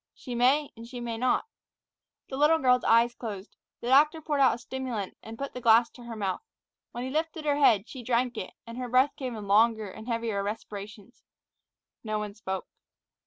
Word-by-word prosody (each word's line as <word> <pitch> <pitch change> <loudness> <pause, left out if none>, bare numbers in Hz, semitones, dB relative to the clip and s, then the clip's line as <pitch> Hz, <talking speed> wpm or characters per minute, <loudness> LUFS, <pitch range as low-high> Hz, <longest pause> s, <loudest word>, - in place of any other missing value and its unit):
"She 250 - -7
may 265 +5 +3
and 230 0 -10
she 245 0 -7
may 235 -1 -3
not." 250 - +1 0.8
The 265 - -6
little 300 +4 +4
girl's 250 -4 +3
eyes 235 +1 +4
closed. 210 -4 -7 0.3
The 240 - -3
doctor 300 +4 +5
poured 295 -2 -2
out 265 -3 +5
a - - -8
stimulant, 240 -5 -5
and 225 +1 -9
put 275 +2 -5
the 250 - -6
glass 230 0 +5
to 245 - -13
her 235 -1 -6
mouth. 200 - -2 0.5
When 240 - -5
he 260 - -4
lifted 315 +1 -2
her 290 -1 +2
head, 225 -7 +4
she 260 - -8
drank 245 +1 0
it, - - -6
and 230 +1 -8
her 250 -1 -4
breath 260 +3 +3
came 255 -4 -5
in 210 -2 -7
longer 215 0 +3
and 220 +4 -11
heavier 230 -4 -1
respirations. 210 +1 -7 0.8
No 215 -1 -2
one 210 -1 -4
spoke. 190 -3 -4
240 Hz, 200 wpm, -28 LUFS, 220-260 Hz, 0.8 s, doctor